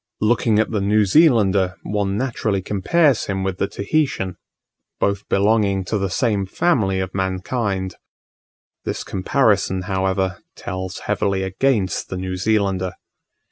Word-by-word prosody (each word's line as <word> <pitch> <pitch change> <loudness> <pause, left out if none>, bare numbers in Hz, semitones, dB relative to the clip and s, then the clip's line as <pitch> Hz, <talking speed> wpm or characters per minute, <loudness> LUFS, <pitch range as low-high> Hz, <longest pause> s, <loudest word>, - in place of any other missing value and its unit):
Looking 110 0 +2
at 110 - +1
the 105 -3 0
New 105 +2 +3
Zealander, 100 - +4
one 100 -1 -1
naturally 110 -6 -1
compares 130 - +2
him 95 -1 -2
with 95 -1 -3
the 100 - +1
Tahitian; 100 - -1 0.6
both 100 0 -1
belonging 100 -2 +2
to 105 +2 -1
the 95 0 -1
same 100 -2 0
family 100 - +1
of 95 -1 -3
mankind. 95 0 -2 0.9
The - - -2
comparison, 100 -2 +1
however, 95 -1 -1 0.2
tells 95 0 -5
heavily 100 -2 0
against 95 +1 0
the 95 - -4
New 95 0 -3
Zealander. 95 -2 0
100 Hz, 130 wpm, -21 LUFS, 95-110 Hz, 0.9 s, Zealander